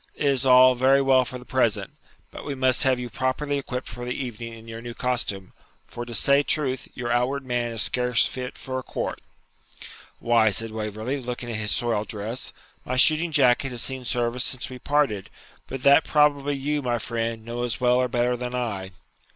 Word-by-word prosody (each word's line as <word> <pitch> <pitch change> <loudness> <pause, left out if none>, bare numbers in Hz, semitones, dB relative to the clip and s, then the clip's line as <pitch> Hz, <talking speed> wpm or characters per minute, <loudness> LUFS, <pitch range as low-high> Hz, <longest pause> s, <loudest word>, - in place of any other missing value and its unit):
It - - -3
is 135 -2 +1
all 130 0 +7
very 130 +2 +4
well 135 -2 +4
for 125 - -6
the 125 - -13
present, 125 -5 0 0.4
and - - -8
we 145 - -4
must 130 -1 +2
have 130 -2 +2
you 125 - -4
properly 135 +4 -2
equipped 130 -2 -5
for 120 +2 -7
the 125 0 -3
evening 115 -3 -6
in 115 0 -14
your 115 0 -8
new 120 0 -8
costume; 110 -7 -1 0.3
for, 120 - -7
to 120 - -4
say 140 +5 +4
truth, 140 -3 -1
your 120 -2 -3
outward 130 +3 0
man 120 -1 -1
is 115 -2 +1
scarce 125 -2 +2
fit 125 -1 -5
for 130 0 -4
a - - -8
court.' - - -4 1.0
'Why,' 115 -2 +3
said 115 +2 -1
Waverley, 110 +5 -4
looking 120 -1 -5
at 110 - -3
his 105 -1 -1
soiled 110 -3 +1
dress,'my 115 +4 -6
shooting 155 +5 +4
jacket 135 -2 +3
has 120 -2 -2
seen 130 -1 -2
service 120 0 0
since 130 0 -1
we 125 - -8
parted; 140 -9 0 0.4
but 130 -1 -6
that 140 +3 +6
probably 145 -1 +2
you, 145 +2 -1
my 120 -2 -1
friend, 115 -1 -3
know 120 +1 -5
as 120 -1 -2
well 125 -1 +3
or 125 0 +2
better 120 0 0
than 125 0 -5
I.' 100 -7 -4
125 Hz, 200 wpm, -24 LUFS, 115-130 Hz, 1.0 s, all